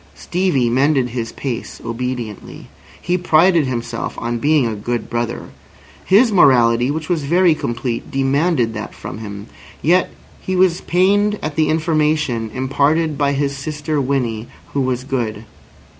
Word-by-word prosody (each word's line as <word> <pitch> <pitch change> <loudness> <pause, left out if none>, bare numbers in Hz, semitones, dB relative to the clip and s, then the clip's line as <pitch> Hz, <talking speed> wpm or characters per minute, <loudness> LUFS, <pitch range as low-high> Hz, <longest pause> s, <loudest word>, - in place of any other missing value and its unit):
Stevie 175 -9 0
mended 135 0 +2
his 115 -1 -4
pace 130 -4 -5
obediently. 120 -2 -5 0.3
He 180 +1 -1
prided 170 -2 +4
himself 120 -2 -4
on 120 0 -3
being 150 0 +3
a 115 - -1
good 120 +3 -4
brother. 120 0 -3 0.5
His 220 +5 +4
morality, 125 - +4
which 155 +1 -3
was 175 -3 0
very 175 +3 +4
complete, 120 -4 -3
demanded 135 -2 +1
that 110 -1 -6
from - - -8
him. 100 -2 -7 0.4
Yet 180 +4 +3 0.3
he 185 - -2
was 180 -1 +3
pained 205 +4 +2
at 155 -1 -3
the 155 -1 +2
information 155 -7 0
imparted 145 +5 +1
by 140 0 +1
his 140 0 -1
sister 150 +1 -3
Winnie 125 -5 -1 0.3
who 140 - 0
was 130 -1 -1
good. 115 -5 -3
140 Hz, 145 wpm, -19 LUFS, 120-160 Hz, 0.5 s, prided